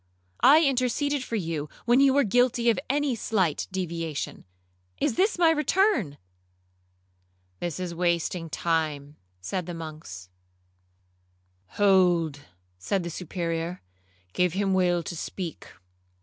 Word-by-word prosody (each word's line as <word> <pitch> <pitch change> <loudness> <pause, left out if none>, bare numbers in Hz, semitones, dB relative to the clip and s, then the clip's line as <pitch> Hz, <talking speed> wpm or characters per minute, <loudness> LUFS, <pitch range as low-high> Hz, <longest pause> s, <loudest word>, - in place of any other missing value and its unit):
I 305 +4 +7
interceded 275 +1 +1
for 230 - -4
you 160 -7 -3 0.2
when 240 +2 +4
you 275 -1 +6
were 285 - +5
guilty 240 +1 +3
of 225 - -2
any 285 -1 +1
slight 195 -8 0
deviation—Is 95 - -5
this 400 - +2
my 335 -2 +5
return?' 300 - +1 1.4
'This 175 -1 -4
is 180 -2 -4
wasting 170 0 -1
time,' 155 -3 -2 0.2
said 180 - -3
the 175 - -5
monks. 155 - -9 1.5
'Hold, 180 -7 +3 0.4
said 190 - -1
the 170 - -5
Superior; 170 0 -4 0.5
'give 180 -2 +1
him 195 0 0
leave 175 -2 +2
to 170 - -6
speak. 170 0 -6
180 Hz, 115 wpm, -26 LUFS, 160-235 Hz, 1.5 s, I